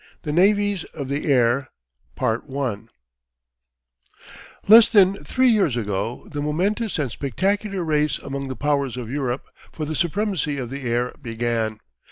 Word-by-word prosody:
THE 150 - -3
NAVIES 200 +2 +3
of 140 -4 -5
THE 140 +3 -2
AIR 125 +1 +3 3.0
Less 225 +2 +9
than 200 -2 +4
three 260 -1 +2
years 195 - +2
ago 105 +1 -3
the 145 -1 -3
momentous 190 +9 -1
and 140 -6 -1
spectacular 195 - -1
race 150 -2 +1
among 140 0 -5
the 130 - -5
Powers 140 -3 -1
of 120 -2 -6
Europe 135 -2 -2 0.3
for 155 - -5
the 155 - -3
supremacy 170 -2 -1
of 125 -2 -5
the 135 -3 -4
air 120 +1 0
began. 115 -2 -2
145 Hz, 135 wpm, -23 LUFS, 125-190 Hz, 3.0 s, Less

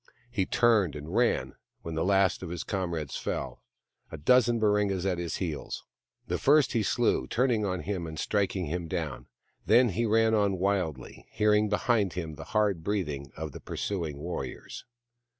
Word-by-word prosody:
He 100 -6 0
turned 110 - +3
and 75 +3 -7
ran, 120 +2 +1 0.3
when 85 - -5
the 80 +1 0
last 95 -1 +3
of 90 - -6
his 85 -1 -4
comrades 85 -7 -3
fell, - - -4 0.5
a 80 - -6
dozen 120 +8 +4
Baringas 105 -3 +1
at 90 -3 0
his 85 -1 -3
heels. 80 -6 -4 0.4
The - - -2
first 145 -1 +4
he 115 - +2
slew, 65 -9 +1
turning 120 -4 +1
on 90 -2 -2
him 95 -4 -3
and 80 -1 -7
striking 100 0 0
him 85 +2 -3
down; 80 -4 -4 0.4
then 120 0 +6
he 115 +5 0
ran 110 +1 +3
on 100 -3 +2
wildly, 90 -8 -2
hearing 105 0 +2
behind 105 -2 +1
him 80 -3 -4
the 75 - -9
hard 100 -6 +2
breathing 75 -10 -2
of 80 -1 -5
the - - -10
pursuing 85 -8 -3
warriors. 85 +4 -6
95 Hz, 170 wpm, -28 LUFS, 80-105 Hz, 0.5 s, then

